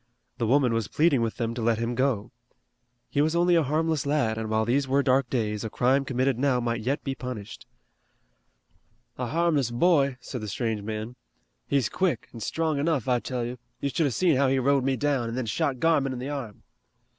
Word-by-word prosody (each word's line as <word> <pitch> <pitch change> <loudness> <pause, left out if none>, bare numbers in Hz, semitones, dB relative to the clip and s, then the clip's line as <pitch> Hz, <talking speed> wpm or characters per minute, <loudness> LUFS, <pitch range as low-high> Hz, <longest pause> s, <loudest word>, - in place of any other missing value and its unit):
The 115 - 0
woman 130 -1 +3
was 115 -3 -1
pleading 150 -5 +2
with 115 -1 -1
them 115 -1 -2
to 120 - -5
let 115 0 +2
him 115 +1 -2
go. 125 -4 0 0.8
He 145 - 0
was 155 +2 +1
only 175 +1 +3
a 170 - +5
harmless 155 +1 0
lad, 140 -6 +1
and 110 -1 -4
while 110 0 +1
these 135 +4 +1
were 140 +2 +2
dark 130 -1 +2
days, 105 -4 -1
a 110 - -3
crime 130 +5 +2
committed 130 -1 0
now 135 -2 +2
might 120 -1 -2
yet 135 +6 -1
be 135 - -2
punished. 125 -6 -7 1.5
"A 125 - -1
harmless 155 -3 +1
boy," 140 0 +2
said 125 0 -6
the 105 - -5
strange 110 0 -2
man. 110 +3 -5 0.5
"He's 135 -5 +2
quick, 180 -11 -1
an' 115 - -8
strong 155 +5 -1
enough, 145 -5 0
I 125 -1 +3
tell 125 -1 -3
you. 125 +1 -6 0.2
You 140 - -1
should 160 +2 +1
have 130 - -2
seen 170 -7 +3
how 140 0 +3
he 135 +1 +2
rode 135 +1 +2
me 135 0 +1
down, 130 -2 0
and 115 - -4
then 130 - -1
shot 125 +4 -1
Garmon 145 -4 +2
in - - -5
the 130 +3 -5
arm." 130 -8 -6
130 Hz, 215 wpm, -26 LUFS, 115-140 Hz, 1.5 s, a